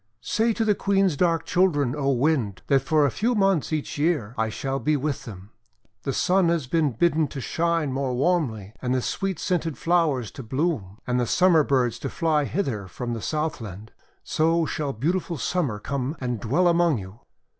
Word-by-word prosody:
:<Say 225 - +1
to 225 0 -1
the 210 - +4
Queen's 195 -4 +1
dark 165 +1 +1
children, 150 -8 +2
O 140 -2 0
Wind, 130 -7 0
that 135 -1 +3
for 150 +2 +2
a 140 - +1
few 235 - 0
months 195 -7 +2
each 155 -1 -3
year, 145 -9 0
I 110 0 0
shall 135 +5 -3
be 150 +1 +1
with 140 0 -3
them. 100 -1 -10 0.5
The 135 - -2
Sun 180 +5 +2
has 170 -5 0
been 150 0 +1
bidden 160 +4 +2
to 140 - -7
shine 165 0 0
more 135 -2 -1
warmly, 125 - 0
and 125 0 0
the 130 - +1
sweet 195 -3 -2
scented 165 -6 -1
flowers 160 -10 +1
to - - -8
bloom, 125 - -2
and 125 0 0
the 120 - 0
Summer 175 0 +4
birds 130 -4 +1
to - - -4
fly 155 -3 +1
hither 130 - -2
from 120 +5 -5
the 115 - -4
Southland. 115 - -4 0.3
So 165 +1 +1
shall 150 -2 -2
beautiful 170 - -1
Summer 145 -7 -1
come 135 +6 -3
and 125 -3 -2
dwell 145 - +2
among 170 -4 +3
you." 95 +2 -9
145 Hz, 190 wpm, -25 LUFS, 125-170 Hz, 0.5 s, the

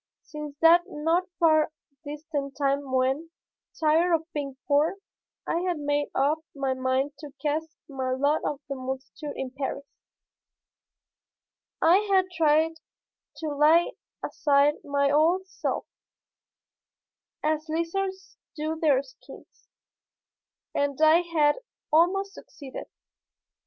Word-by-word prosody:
Since 300 -1 -8
that 340 +2 +7
not 335 +2 0
far 310 -2 +4 0.3
distant 290 -2 -5
time 280 -1 0
when, 265 +5 +1 0.5
tired 330 +2 +4
of 325 +1 -6
being 275 -3 -4
poor, 295 +5 +3 0.5
I 335 - 0
had 355 -1 -1
made 290 0 0
up 290 +4 +2 0.2
my 270 -2 0
mind 260 +2 0
to 295 -2 -9
cast 310 +1 -2
my 265 -2 -3
lot 285 +4 +1
with 290 -1 -3
the 275 - -3
multitude 265 +3 -6
in 265 -1 -4
Paris, 275 +1 -4 2.0
I 335 +3 +7
had 375 -1 +3
tried 320 +1 +3 0.6
to 315 - -2
lay 320 +9 +4 0.3
aside 285 0 +2
my 280 -1 +1
old 335 +6 +3
self, - - -3 1.6
as 310 +1 0
lizards 375 +4 -3 0.2
do 315 +1 -3
their 285 -4 +3
skins, - - -16 1.1
and 285 -1 -1
I 315 +2 +6
had 310 -4 +2 0.4
almost 390 +5 +3
succeeded. 275 -3 -10
300 Hz, 115 wpm, -27 LUFS, 280-330 Hz, 2.0 s, that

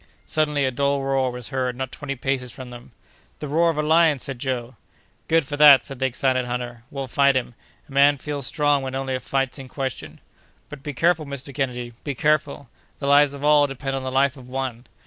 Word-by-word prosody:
Suddenly, 150 -2 +1
a 130 - 0
dull 140 +2 0
roar 135 -1 +1
was 125 -2 -6
heard 130 -2 -2
not 130 +1 -4
twenty 140 -2 -5
paces 130 -1 -2
from 125 0 -10
them. 120 0 -12 0.5
"The 150 - -6
roar 165 +4 +2
of 160 - -2
a 150 - +1
lion!" 160 -1 +4
said 135 -1 -5
Joe. 125 -2 -3 0.5
"Good 165 -2 +3
for 145 +1 -5
that!" 145 -2 +8
said 135 -3 -5
the 135 - +2
excited 130 0 0
hunter; 120 -1 -5
"we'll 135 -1 -5
fight 140 +1 +3
him. 125 -2 -1 0.3
A - - -18
man 140 +1 +5
feels 145 -1 -3
strong 145 -2 +2
when 130 0 -5
only 135 0 -2
a 130 - -1
fight's 135 +1 -2
in 135 - -8
question." 130 -1 -5 0.5
"But 150 -2 -10
be 145 0 -6
careful, 165 0 +2
Mr. 140 0 -6
Kennedy; 125 -2 -3
be 140 -2 -3
careful! 145 0 0 0.3
The 140 - -6
lives 145 0 +4
of 140 +1 -5
all 150 -1 +5
depend 135 0 -5
upon 135 - -4
the 130 - -3
life 135 +1 +2
of 125 -1 -13
one." 130 -2 -4
135 Hz, 220 wpm, -23 LUFS, 130-145 Hz, 0.5 s, that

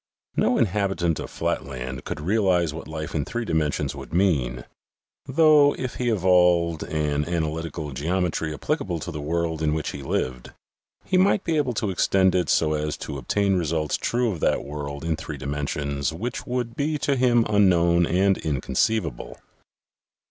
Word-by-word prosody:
No - - +2
inhabitant 95 -6 0
of - - -6
flatland 65 -1 -4
could - - -4
realize 90 -2 +1
what 80 - -8
life 80 +2 -5
in 75 - 0
three 120 +9 -4
dimensions 80 -6 0
would - - -8
mean, 65 -11 +1 0.6
though, 150 0 +5
if 130 -2 -4
he 125 -1 0
evolved 90 -5 +3
an 75 -2 -1
analytical 80 -2 -3
geometry 80 +3 -1
applicable 80 +3 -2
to 80 - -6
the 75 - -5
world 80 +1 -1
in 75 -1 +1
which 80 - -2
he 70 - -7
lived, 65 -2 -3 0.5
he 185 -1 +2
might 195 +1 +3
be 165 - 0
able 140 -5 +1
to 105 -2 -1
extend 95 0 +3
it 90 -4 +1
so 75 -1 +3
as 75 0 -2
to 70 -2 -6
obtain 100 +9 +1
results 80 -2 -1
true 120 -1 0
of 90 - -5
that - - +1
world 70 0 -6
in 80 -1 0
three 75 -1 -7
dimensions 70 0 -2
which 115 +10 -5
would 120 -2 -2
be 150 +2 0
to 140 -1 0
him 120 -2 +3
unknown 85 -4 +4
and 95 +2 +2
inconceivable. 70 - -1
85 Hz, 165 wpm, -24 LUFS, 75-105 Hz, 0.6 s, though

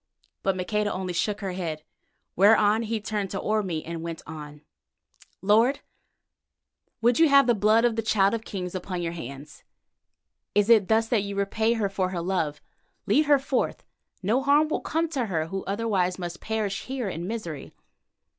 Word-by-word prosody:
But 195 -1 +1
Maqueda 210 +3 -1
only 185 -1 -3
shook 205 +4 -1
her 195 -2 -3
head, 165 -4 -4 0.5
whereon 210 +2 +5
he 225 0 -2
turned 210 -2 -3
to 195 - -4
Orme 195 -7 -1
and 165 0 -5
went 165 -1 -6
on: 150 -1 -9 0.8
"Lord, 225 +7 +3 1.2
would 240 +3 +4
you 325 -2 +6
have 280 -1 +6
the 240 - +4
blood 215 +2 +3
of 235 -2 +2
the 225 - 0
Child 205 -2 +2
of 225 -1 -2
Kings 180 -4 -5
upon 180 -1 -4
your 165 - -2
hands? 145 -2 -9 0.9
Is 205 +2 +4
it 215 -5 +6
thus 225 0 +2
that 230 -4 +2
you 200 0 -5
repay 220 +3 +1
her 220 -3 0
for 190 -1 -1
her 180 -2 -3
love? 170 -5 -1 0.4
Lead 305 - +3
her 290 -1 +6
forth. 270 -1 -2 0.4
No 225 +8 +2
harm 290 +3 +3
will - - -1
come 325 +2 -1
to 265 -7 -2
her 160 -5 -1
who 195 +4 -5
otherwise 195 -3 0
must 175 -1 -6
perish 215 -3 -2
here 260 -4 -3
in 175 -1 -4
misery." 190 -10 -5
200 Hz, 175 wpm, -26 LUFS, 180-225 Hz, 1.2 s, you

